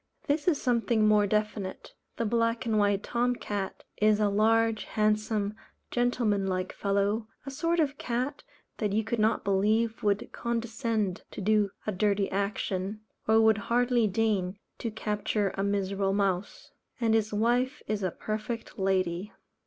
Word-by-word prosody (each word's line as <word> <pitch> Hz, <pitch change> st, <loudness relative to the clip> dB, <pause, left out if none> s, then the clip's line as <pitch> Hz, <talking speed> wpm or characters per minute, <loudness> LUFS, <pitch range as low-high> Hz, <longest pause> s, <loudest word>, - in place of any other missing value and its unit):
This 290 Hz, +2 st, 0 dB
is 310 Hz, -5 st, +3 dB
something 235 Hz, -3 st, +2 dB
more 210 Hz, -1 st, +4 dB
definite. 210 Hz, -2 st, -2 dB, 0.2 s
The 230 Hz, -, 0 dB
Black 230 Hz, +2 st, +1 dB
and 220 Hz, -2 st, +2 dB
white 205 Hz, -1 st, +2 dB
Tom 245 Hz, +1 st, 0 dB
cat 205 Hz, -4 st, -4 dB
is 215 Hz, 0 st, +4 dB
a 210 Hz, -1 st, +3 dB
large, 225 Hz, +2 st, +2 dB
handsome, 215 Hz, -1 st, 0 dB, 0.4 s
gentlemanlike 205 Hz, -7 st, 0 dB
fellow, 200 Hz, +2 st, 0 dB, 0.2 s
a 275 Hz, -, -5 dB
sort 330 Hz, +5 st, 0 dB
of 285 Hz, -3 st, 0 dB
cat 255 Hz, +4 st, -2 dB, 0.4 s
that 210 Hz, -3 st, 0 dB
you 220 Hz, +2 st, +2 dB
could 230 Hz, +1 st, -2 dB
not 220 Hz, +1 st, +2 dB
believe 215 Hz, +3 st, +1 dB
would 205 Hz, -1 st, 0 dB
condescend 230 Hz, -4 st, -2 dB
to -, -, -8 dB
do 210 Hz, 0 st, +2 dB, 0.2 s
a 215 Hz, -, 0 dB
dirty 200 Hz, 0 st, +1 dB
action, 200 Hz, 0 st, -2 dB, 0.3 s
or 220 Hz, 0 st, +5 dB
would 220 Hz, -1 st, +4 dB
hardly 240 Hz, -1 st, +3 dB
deign 200 Hz, -2 st, 0 dB, 0.2 s
to 235 Hz, -, -2 dB
capture 210 Hz, -2 st, -1 dB
a 195 Hz, -, -3 dB
miserable 195 Hz, -1 st, 0 dB
mouse; 195 Hz, -1 st, -1 dB, 0.3 s
and 230 Hz, -2 st, +2 dB
his 220 Hz, -1 st, +2 dB
wife 245 Hz, +6 st, +1 dB
is 215 Hz, -1 st, -2 dB
a 185 Hz, -, +1 dB
perfect 220 Hz, +5 st, -5 dB
lady. 190 Hz, 0 st, 0 dB
215 Hz, 150 wpm, -29 LUFS, 200-230 Hz, 0.4 s, or